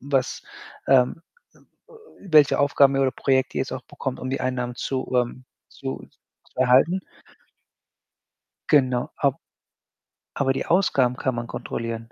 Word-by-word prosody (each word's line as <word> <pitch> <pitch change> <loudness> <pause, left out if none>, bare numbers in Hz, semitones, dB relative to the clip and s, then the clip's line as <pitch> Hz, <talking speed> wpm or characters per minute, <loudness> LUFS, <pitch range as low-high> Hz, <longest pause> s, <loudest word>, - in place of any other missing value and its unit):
was, 135 -1 -1 0.4
ähm 135 +4 +3 0.3
äh, - - -23 0.6
welche 155 -7 +4
Aufgaben 140 -1 +4
oder 135 -1 +2
Projekte 130 -1 0
ihr - - +2
jetzt 130 - -7
auch 130 -1 -5
bekommt, 135 0 -6
um 130 - -4
die 135 - -2
Einnahmen 125 -1 -2
zu, 130 +1 -3
ähm 125 +1 -1 0.2
zu 135 -1 -7 0.4
zu - - -29
erhalten. 130 +9 +4 1.7
Genau, 130 -4 +2
a 140 -1 +2 1.0
aber 135 -1 +1
die - - -3
Ausgaben 135 -9 +2
kann 130 -2 -1
man 120 0 -4
kontrollieren 115 0 -5
130 Hz, 135 wpm, -23 LUFS, 125-140 Hz, 1.7 s, welche